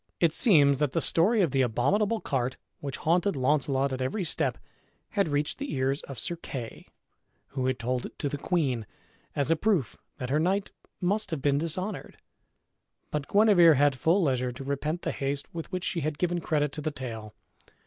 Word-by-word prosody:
It 165 Hz, -3 st, +3 dB
seems 145 Hz, -, +5 dB
that 150 Hz, -3 st, 0 dB
the -, -, +2 dB
story 200 Hz, +8 st, +3 dB
of 165 Hz, -, +1 dB
the 135 Hz, -, +2 dB
abominable 200 Hz, -, +1 dB
cart, 130 Hz, -1 st, -1 dB, 0.2 s
which 140 Hz, -2 st, -5 dB
haunted 175 Hz, +3 st, +1 dB
Launcelot 135 Hz, 0 st, +1 dB
at 130 Hz, -, -3 dB
every 160 Hz, +11 st, -1 dB
step, 165 Hz, -, -1 dB, 0.5 s
had 200 Hz, -4 st, +1 dB
reached 145 Hz, -, -1 dB
the 285 Hz, 0 st, -4 dB
ears 135 Hz, +2 st, 0 dB
of 135 Hz, -, -7 dB
Sir 170 Hz, +10 st, -3 dB
Kay, 125 Hz, -8 st, -7 dB, 0.6 s
who 130 Hz, -2 st, -2 dB
had 130 Hz, -1 st, 0 dB
told 125 Hz, +1 st, -2 dB
it -, -, -18 dB
to 145 Hz, -, -2 dB
the 145 Hz, 0 st, -4 dB
queen, 135 Hz, -, 0 dB, 0.5 s
as 145 Hz, +2 st, +1 dB
a -, -, +5 dB
proof 165 Hz, -, 0 dB, 0.2 s
that 130 Hz, -2 st, -4 dB
her 150 Hz, -, +3 dB
knight 190 Hz, +5 st, 0 dB, 0.3 s
must 205 Hz, +4 st, 0 dB
have 155 Hz, -5 st, -4 dB
been 140 Hz, -1 st, +3 dB
dishonored. 185 Hz, +5 st, -4 dB, 0.9 s
But 150 Hz, -2 st, -2 dB
Guenever 200 Hz, -6 st, +6 dB
had 145 Hz, +1 st, +4 dB
full 170 Hz, +8 st, +2 dB
leisure 130 Hz, -4 st, +1 dB
to 130 Hz, +3 st, -8 dB
repent 150 Hz, +5 st, -2 dB
the -, -, -1 dB
haste 140 Hz, 0 st, -3 dB
with 165 Hz, +1 st, -6 dB
which 185 Hz, -1 st, -3 dB
she 180 Hz, -, -1 dB
had 150 Hz, 0 st, -2 dB
given 175 Hz, 0 st, 0 dB
credit 150 Hz, -3 st, 0 dB
to 150 Hz, -, -6 dB
the 155 Hz, -, -1 dB
tale. 115 Hz, -7 st, -7 dB
145 Hz, 190 wpm, -28 LUFS, 135-175 Hz, 0.9 s, Guenever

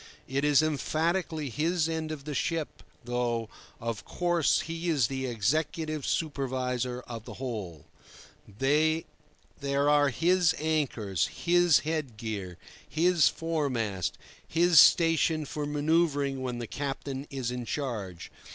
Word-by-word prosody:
It 135 Hz, +2 st, -1 dB
is 150 Hz, 0 st, +5 dB
emphatically 155 Hz, 0 st, -1 dB
his 160 Hz, +6 st, +1 dB
end 160 Hz, -1 st, -3 dB
of 145 Hz, -3 st, -7 dB
the 150 Hz, -, -4 dB
ship, 160 Hz, +3 st, -2 dB, 0.2 s
though, 120 Hz, -2 st, -1 dB, 0.3 s
of 115 Hz, -2 st, -4 dB
course, 175 Hz, -4 st, +1 dB
he 165 Hz, +1 st, -4 dB
is 145 Hz, -7 st, +3 dB
the 130 Hz, +2 st, -3 dB
executive 150 Hz, +6 st, -1 dB
supervisor 130 Hz, -4 st, -1 dB
of 115 Hz, -3 st, -8 dB
the -, -, -8 dB
whole. 105 Hz, -, -6 dB, 0.6 s
There 150 Hz, +9 st, +1 dB, 0.8 s
are 145 Hz, -1 st, +5 dB
his 170 Hz, +4 st, +3 dB
anchors, 130 Hz, -, 0 dB
his 175 Hz, -2 st, +3 dB
headgear, 110 Hz, -, -4 dB, 0.3 s
his 170 Hz, +1 st, +4 dB
foremast, 130 Hz, -, -1 dB, 0.3 s
his 170 Hz, 0 st, +5 dB
station 165 Hz, -2 st, +5 dB
for 145 Hz, +1 st, -4 dB
manoeuvring 145 Hz, -2 st, +1 dB
when 125 Hz, -2 st, -3 dB
the 120 Hz, -, -4 dB
captain 140 Hz, +1 st, -4 dB
is 130 Hz, -3 st, -3 dB
in 125 Hz, -1 st, -4 dB
charge. 110 Hz, -, -4 dB
145 Hz, 120 wpm, -29 LUFS, 125-160 Hz, 0.8 s, is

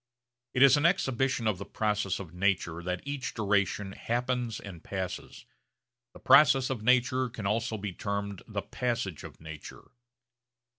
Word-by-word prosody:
It 130 Hz, -, +6 dB
is 140 Hz, +1 st, +7 dB
an 145 Hz, -, +1 dB
exhibition 135 Hz, -8 st, 0 dB
of 105 Hz, -4 st, +1 dB
the -, -, -4 dB
process 105 Hz, -3 st, -1 dB
of 90 Hz, -4 st, -9 dB
nature 90 Hz, -3 st, 0 dB
that 90 Hz, +4 st, -4 dB
each 140 Hz, -2 st, -4 dB
duration 100 Hz, -2 st, 0 dB
happens 120 Hz, +1 st, -2 dB
and 90 Hz, -5 st, -10 dB
passes. 95 Hz, -2 st, -5 dB, 0.7 s
The -, -, -13 dB
process 135 Hz, -2 st, +6 dB
of 125 Hz, -5 st, -3 dB
nature 125 Hz, +2 st, +3 dB
can 110 Hz, -3 st, -7 dB
also 110 Hz, +2 st, 0 dB
be 100 Hz, -2 st, -5 dB
termed 100 Hz, 0 st, -4 dB
the 105 Hz, -2 st, -4 dB
passage 120 Hz, -, -3 dB
of -, -, -11 dB
nature. 80 Hz, -2 st, -10 dB
105 Hz, 150 wpm, -29 LUFS, 95-125 Hz, 0.7 s, is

